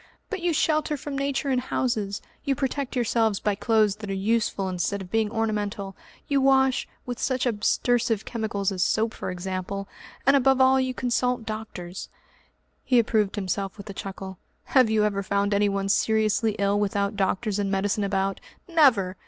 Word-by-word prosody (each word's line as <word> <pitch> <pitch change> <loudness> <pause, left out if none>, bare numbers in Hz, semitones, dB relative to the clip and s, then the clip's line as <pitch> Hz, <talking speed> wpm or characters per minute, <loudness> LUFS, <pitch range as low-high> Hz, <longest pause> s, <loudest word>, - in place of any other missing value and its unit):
But 400 -4 -3
you 350 0 +1
shelter 305 -1 +1
from 290 0 -6
Nature 275 0 -1
in 255 - +2
houses, 220 -6 -2 0.2
you 275 -2 0
protect 275 +1 -2
yourselves 225 -4 +1
by 210 - 0
clothes 215 -1 +2
that 210 -2 -7
are 195 - -1
useful 205 -1 0
instead 185 +2 -1
of 190 -1 -9
being 225 -1 +1
ornamental, 210 -3 -2 0.3
you 280 -1 +2
wash 265 -1 +3 0.2
with 245 -1 -5
such 260 -1 0
abstersive 230 0 +1
chemicals 210 -4 -2
as 185 -2 -3
soap 220 +4 +1
for - - -5
example 185 +2 -4 0.4
and 275 +2 +6
above 270 -1 +4
all 260 0 +5
you 260 -1 -1
consult 250 -1 0
doctors." 210 -5 -6 0.7
He 250 - +3
approved 215 -3 +2
himself 195 -1 -3
with 200 0 -8
a - - -9
chuckle. 190 -1 -7 0.2
"Have 255 -4 +4
you 215 -1 +3
ever 200 -2 0
found 200 +1 0
anyone 200 -1 +1
seriously 220 +1 +2
ill 200 0 +1
without 200 0 0
doctors 200 +2 0
and 200 -1 0
medicine 195 +1 0
about? 195 0 -1 0.3
Never! 245 - +3
215 Hz, 170 wpm, -25 LUFS, 195-250 Hz, 0.7 s, and